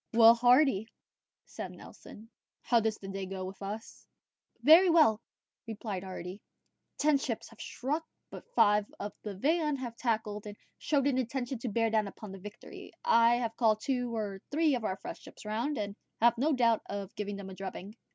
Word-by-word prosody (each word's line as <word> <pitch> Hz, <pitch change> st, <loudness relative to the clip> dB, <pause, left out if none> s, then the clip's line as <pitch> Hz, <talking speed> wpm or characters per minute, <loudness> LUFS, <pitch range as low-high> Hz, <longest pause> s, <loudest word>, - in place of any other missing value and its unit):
"Well, 230 Hz, 0 st, +9 dB
Hardy," 245 Hz, -2 st, +4 dB, 0.6 s
said -, -, -7 dB
Nelson, 225 Hz, +3 st, -13 dB, 0.3 s
"how 235 Hz, -, +4 dB
goes 220 Hz, -1 st, -1 dB
the 195 Hz, -, -10 dB
day 195 Hz, -1 st, -4 dB
with 190 Hz, +1 st, -6 dB
us?" 210 Hz, +3 st, -7 dB, 0.6 s
"Very 340 Hz, +5 st, +8 dB
well," 300 Hz, -10 st, +5 dB, 0.5 s
replied 210 Hz, -4 st, -5 dB
Hardy: 185 Hz, +1 st, -7 dB, 0.6 s
"ten 295 Hz, -1 st, +3 dB
ships 240 Hz, -5 st, -4 dB
have 225 Hz, -, -14 dB
struck, 295 Hz, +6 st, -3 dB, 0.3 s
but 485 Hz, -, -11 dB
five 210 Hz, 0 st, +4 dB
of 205 Hz, -, -5 dB
the 210 Hz, -2 st, -6 dB
van 300 Hz, -, +1 dB
have 245 Hz, -3 st, -6 dB
tacked 230 Hz, -2 st, 0 dB, 0.2 s
and 205 Hz, 0 st, -8 dB, 0.2 s
show 295 Hz, -, 0 dB
an 270 Hz, -1 st, +1 dB
intention 255 Hz, 0 st, -3 dB
to 240 Hz, -, -3 dB
bear 225 Hz, +1 st, +1 dB
down 215 Hz, -2 st, +2 dB
upon 200 Hz, 0 st, -9 dB
the 195 Hz, -, -9 dB
Victory. 210 Hz, +2 st, -10 dB
I 235 Hz, -, +5 dB
have 230 Hz, -2 st, -2 dB
called 220 Hz, -3 st, +3 dB
two 245 Hz, -2 st, -1 dB
or 200 Hz, -3 st, -4 dB
three 310 Hz, 0 st, +2 dB
of 245 Hz, -3 st, -1 dB
our 190 Hz, -3 st, -2 dB
fresh -, -, -8 dB
ships -, -, -13 dB
round, 235 Hz, +7 st, -2 dB
and 205 Hz, -1 st, -3 dB, 0.2 s
have 235 Hz, +1 st, +5 dB
no 285 Hz, +7 st, +1 dB
doubt 235 Hz, -5 st, +3 dB
of 200 Hz, -1 st, -5 dB
giving 205 Hz, -1 st, -4 dB
them 195 Hz, -1 st, -8 dB
a -, -, -7 dB
drubbing." 195 Hz, +2 st, -7 dB
225 Hz, 180 wpm, -31 LUFS, 205-255 Hz, 0.6 s, Well